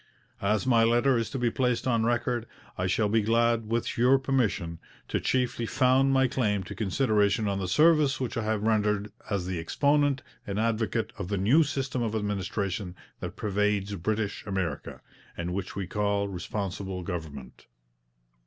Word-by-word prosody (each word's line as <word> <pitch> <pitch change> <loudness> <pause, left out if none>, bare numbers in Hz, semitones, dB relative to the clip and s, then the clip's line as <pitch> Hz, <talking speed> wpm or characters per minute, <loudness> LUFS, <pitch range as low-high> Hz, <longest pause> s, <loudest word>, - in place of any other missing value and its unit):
'As 105 +4 +1
my 120 -3 +4
letter 120 +4 +3
is 115 -1 -1
to 135 - -4
be 120 -2 +1
placed 125 -1 0
on 115 -3 +2
record, 120 0 0 0.3
I 90 - -1
shall 105 +4 +2
be 110 +2 +2
glad, 115 +1 +2
with 115 0 -1
your 125 +3 +5
permission, 115 -11 -1 0.3
to - - 0
chiefly 125 -2 0
found 130 +1 +3
my 135 -1 +4
claim 105 -6 0
to 90 - -8
consideration 105 -1 +1
on 100 -1 -1
the 95 - -2
service 150 - +4
which 130 -1 -3
I 115 - -1
have 110 -1 -1
rendered 105 -2 +1 0.2
as 100 -4 -1
the 90 -2 -3
exponent 140 - +1 0.2
and 100 +1 -2
advocate 115 0 0
of 100 - -3
the 100 +1 -1
new 115 - +4
system 135 -4 -1
of 110 -2 -1
administration 100 -2 -2 0.2
that - - -6
pervades 105 -1 0
British 105 +2 -2
America, 95 -7 -3 0.4
and 85 +1 -3
which 95 -1 -4
we 100 -1 -3
call 100 +1 0
Responsible 95 0 -4
Government.' 80 -8 -7
110 Hz, 165 wpm, -28 LUFS, 100-120 Hz, 0.4 s, your